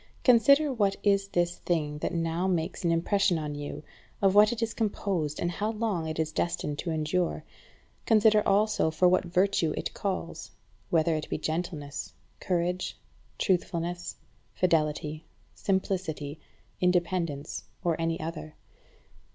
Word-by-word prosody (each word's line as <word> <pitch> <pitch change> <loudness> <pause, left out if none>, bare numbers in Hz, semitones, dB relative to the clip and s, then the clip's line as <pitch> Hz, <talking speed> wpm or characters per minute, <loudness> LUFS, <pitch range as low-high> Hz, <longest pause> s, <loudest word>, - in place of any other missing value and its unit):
Consider 280 +4 +5
what 200 -5 +1
is 200 -1 +3
this 175 -2 0
thing 150 -4 -1
that - - -2
now 165 +2 -1
makes 175 -1 -1
an 170 - +2
impression 180 +2 +2
on 150 -2 -3
you, 145 +1 -6 0.4
of 195 -1 +3
what 210 +1 +7
it 235 -1 -2
is 225 - -2
composed, 190 -8 -1
and 175 - 0
how 210 +6 -2
long 210 -7 -1
it 155 - -4
is 155 -1 -1
destined 150 -3 -2
to 175 - -3
endure. 160 +3 -1 0.6
Consider 215 -1 +5
also 205 -3 +3
for 160 +3 +3
what 185 +1 +3
virtue 180 -2 +1
it - - -3
calls; 190 -4 -4 0.4
whether 165 -1 +3
it 155 - -4
be - - -1
gentleness, 155 -2 -4 0.3
courage, 180 0 -1 0.4
truthfulness, 175 -2 -1 0.4
fidelity, 155 -2 0 0.3
simplicity, 180 -6 -2 0.4
independence, 175 -5 0 0.2
or 170 -2 +2
any 165 0 0
other. 155 -1 -6
175 Hz, 135 wpm, -28 LUFS, 160-195 Hz, 0.6 s, what